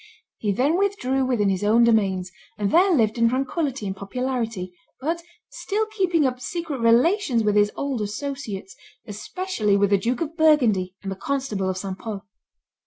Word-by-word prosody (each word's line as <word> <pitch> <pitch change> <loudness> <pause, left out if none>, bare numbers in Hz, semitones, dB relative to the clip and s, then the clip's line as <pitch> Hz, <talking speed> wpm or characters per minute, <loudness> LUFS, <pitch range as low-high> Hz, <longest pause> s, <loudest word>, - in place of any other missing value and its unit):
He 210 - 0
then 280 - +1
withdrew 270 -10 0
within 215 -6 +1
his 190 0 -1
own 220 +3 +4
domains, 195 -5 +2 0.3
and 205 -2 -1
there 370 +4 +5
lived 230 -7 +2
in 230 0 +4
tranquillity 270 -1 -2
and 190 -1 -3
popularity, 225 -3 -3 0.3
but 330 +5 -2 0.3
still 430 +2 -2
keeping 375 -8 +1
up 250 -1 -1
secret 320 0 -4
relations 245 - +3
with 210 -1 +1
his 205 0 +4
old 275 -5 -2
associates, 210 -3 -5 0.3
especially 215 - -1
with 200 0 +2
the 200 - +4
Duke 240 +4 -1
of 325 0 -3
Burgundy 240 - +3
and 195 - -4
the - - -3
constable 215 -5 -2
of 185 - -2
St. 190 0 -5
Pol. 210 -3 -6
235 Hz, 170 wpm, -23 LUFS, 205-290 Hz, 0.3 s, there